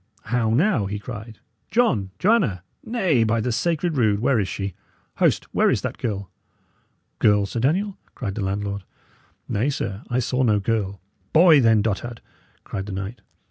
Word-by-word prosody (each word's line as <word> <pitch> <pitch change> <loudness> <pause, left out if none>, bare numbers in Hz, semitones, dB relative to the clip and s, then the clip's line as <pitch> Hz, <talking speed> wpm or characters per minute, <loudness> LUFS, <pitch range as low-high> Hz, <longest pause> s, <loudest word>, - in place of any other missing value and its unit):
how 115 0 0
now!" 125 - +2
he 105 +1 -3
cried. 110 0 -8 0.3
"John! 170 - +2
Joanna! 180 - +2 0.2
Nay, 190 - +2
by 115 +1 +1
the 120 +3 -1
sacred 165 +4 0
rood! 105 -4 +3
where 125 +1 +2
is 100 - 0
she? 95 +1 -4 0.4
Host, - - +2
where - - +4
is - - +1
that - - -4
girl?" 100 -5 -3 0.9
"Girl, 105 -1 +4
Sir 115 - -4
Daniel?" 185 - 0 0.2
cried 105 -7 -4
the 100 - -3
landlord. 100 +1 -2 0.7
"Nay, 115 +8 0
sir, 105 -7 -3
I 120 - 0
saw 125 +1 0
no 110 -5 +3
girl." 100 -2 -1 0.3
"Boy, 160 -3 +7
then, 115 -3 +4
dotard!" 115 +2 -2 0.4
cried 95 +1 -5
the - - -5
knight. 100 +5 -5
115 Hz, 165 wpm, -23 LUFS, 100-135 Hz, 0.9 s, Boy